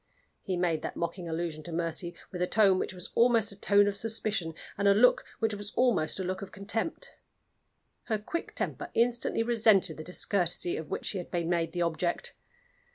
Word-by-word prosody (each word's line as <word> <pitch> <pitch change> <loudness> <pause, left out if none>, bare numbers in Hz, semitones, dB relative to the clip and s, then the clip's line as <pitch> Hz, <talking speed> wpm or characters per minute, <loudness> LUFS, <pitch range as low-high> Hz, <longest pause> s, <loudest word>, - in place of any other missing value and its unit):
He 185 -3 -3
made 170 -3 +1
that - - -5
mocking 170 0 -4
allusion 160 -1 -3
to 170 - -7
Mercy 170 +1 -1 0.2
with 180 - -5
a 180 - +2
tone 195 -3 +4
which - - -2
was 180 -1 -6
almost 230 -3 +4
a - - -7
tone 205 +1 +4
of 200 - -1
suspicion, 215 -6 -1 0.2
and 200 0 +1
a 200 - +6
look 245 +4 +5
which 225 -1 0
was 205 0 -2
almost 240 -10 +2
a - - -1
look 185 +1 -3
of 195 - -7
contempt. 225 - -3 0.9
Her 220 - 0
quick 275 +11 -5
temper - - -3
instantly 235 -1 +1
resented 220 -8 +4
the 155 - -6
discourtesy 180 0 0
of 160 - -6
which - - -3
she 195 - -1
had 175 - -7
been 170 -1 -2
made 165 -2 0
the 175 0 -1
object. 170 +1 -1
190 Hz, 195 wpm, -29 LUFS, 170-215 Hz, 0.9 s, a